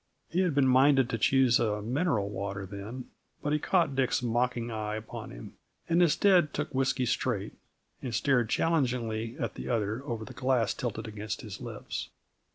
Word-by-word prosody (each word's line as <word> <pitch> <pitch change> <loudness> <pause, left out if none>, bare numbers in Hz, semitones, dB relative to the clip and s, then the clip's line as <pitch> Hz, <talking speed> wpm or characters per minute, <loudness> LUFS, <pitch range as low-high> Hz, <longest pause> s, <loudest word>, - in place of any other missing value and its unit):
He 175 - 0
had 180 -6 +2
been 140 -2 +4
minded 130 -1 +5
to 115 - -1
choose 130 +1 +4
a 105 -2 0
mineral 120 - 0
water 100 0 -4
then, 105 +6 -8 0.3
but 150 - 0
he 150 - +2
caught 170 -4 +2
Dick's 130 -1 +1
mocking 120 0 0
eye 105 -1 -3
upon 110 0 -7
him, - - -10 0.3
and 170 +1 +3
instead 175 -1 +4
took - - -3
whisky 130 -1 +1
straight, - - -1 0.5
and 125 -4 -3
stared 125 -6 +2
challengingly 120 -8 0
at - - -3
the - - -6
other 110 +1 -1
over 115 -5 -4
the - - -10
glass 125 -4 +1
tilted 115 -2 -4
against 105 -3 -5
his - - -8
lips. - - -5
125 Hz, 170 wpm, -29 LUFS, 110-135 Hz, 0.5 s, minded